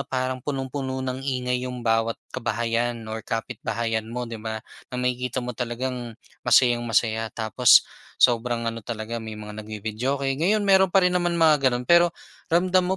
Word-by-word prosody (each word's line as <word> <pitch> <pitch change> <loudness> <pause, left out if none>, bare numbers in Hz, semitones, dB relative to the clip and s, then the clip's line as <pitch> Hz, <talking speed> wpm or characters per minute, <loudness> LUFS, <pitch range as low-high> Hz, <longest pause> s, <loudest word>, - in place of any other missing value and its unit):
parang 130 0 -2
punong-puno 130 -1 -3
ng 130 0 -3
ingay 125 -2 -1
'yong 125 -1 -7
bawat 115 0 +1 0.2
kabahayan 120 -1 -1
or 110 0 -5
kapitbahayan 115 0 -3
mo 125 +1 -4
'di 115 -2 -7
ba? 110 0 -4 0.3
Na 125 - -5
makikita 125 0 -1
mo 125 - -4
talagang 120 -1 -4 0.2
masayang-masaya 120 -2 +2
tapos 110 +2 +5 0.3
sobrang 120 0 +2
ano 115 0 -3
talaga 115 +1 -5
may 110 -1 -7
mga 105 0 -8
nagvi-videoke. 110 +6 -3 0.2
Ngayon 205 +5 +2
meron 190 -1 +5
pa 190 +1 +4
rin 180 - +3
naman 175 -1 +1
mga 150 -5 +5
gano'n, 125 0 -2
pero 170 +2 +4 0.3
ramdam 185 +2 +2
125 Hz, 155 wpm, -24 LUFS, 115-135 Hz, 0.3 s, tapos